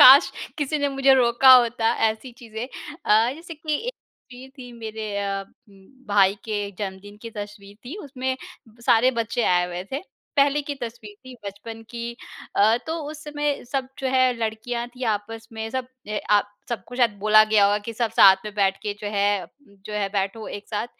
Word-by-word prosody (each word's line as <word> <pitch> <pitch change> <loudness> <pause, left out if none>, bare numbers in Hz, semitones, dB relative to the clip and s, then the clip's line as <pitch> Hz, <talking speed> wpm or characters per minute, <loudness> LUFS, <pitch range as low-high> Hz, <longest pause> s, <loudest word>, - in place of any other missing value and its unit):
काश! 270 +5 +10 0.3
किसी 300 +1 0
ने 285 0 +1
मुझे 270 0 +4
रोका 255 +1 +6
होता 235 -2 +4 0.2
ऐसी 230 +3 -8
चीज़ें 230 0 -6 0.4
अ, 220 +3 +4
जैसे 335 +1 -9
कि 310 0 -3
एक - - -2 0.4
वीर 255 +2 -11
थी 245 -1 -9
मेरे 220 -3 -5
अ, 195 -1 -2 0.3
उम, 195 -1 -19 0.2
भाई 200 -1 +4
के 205 -3 -2
जन्मदिन 205 0 -6
की 230 - -7
तस्वीर 205 -1 -9
थी, 295 +11 -7
उसमें 260 -2 -3 0.3
ब 225 +2 -22
सारे 240 +3 +5
बच्चे 230 +1 -1
आए 180 0 +2
हुए 180 0 -5
थे। 280 - -2 0.3
पहले 285 +1 +4
की 285 0 -4
तस्वीर 225 -3 -7
थी 255 -1 -10
बचपन 215 +3 -8
की 235 0 -5 0.4
अ, 220 +3 +5
तो 320 - -2 0.2
उस 310 0 -9
समय 295 -1 -2
सब 265 -2 -1
जो 270 - -2
है 255 -1 +4
लड़कियाँ 230 +2 -3
थीं। 250 +1 -7
आपस 225 +2 -3
में 220 0 -4
सब 260 -1 -3 0.2
ए 210 0 -1
अ, 205 -1 +6 0.3
सबको 240 +1 -5
शायद 240 -2 +4
बोला 215 +1 +7
गया 215 -2 +4
होगा 205 +1 +3
कि 230 - -3
सब 230 0 -1
साथ 195 -3 +8
में 210 -1 -6
बैठ 195 -1 +2
के 210 - -2
जो 210 - -5
है 200 -1 +2 0.4
जो 215 - -7
है 205 -1 -1
बैठो 200 +2 -2
एक 205 - -8
साथ 210 +1 -2
225 Hz, 195 wpm, -24 LUFS, 205-255 Hz, 0.4 s, काश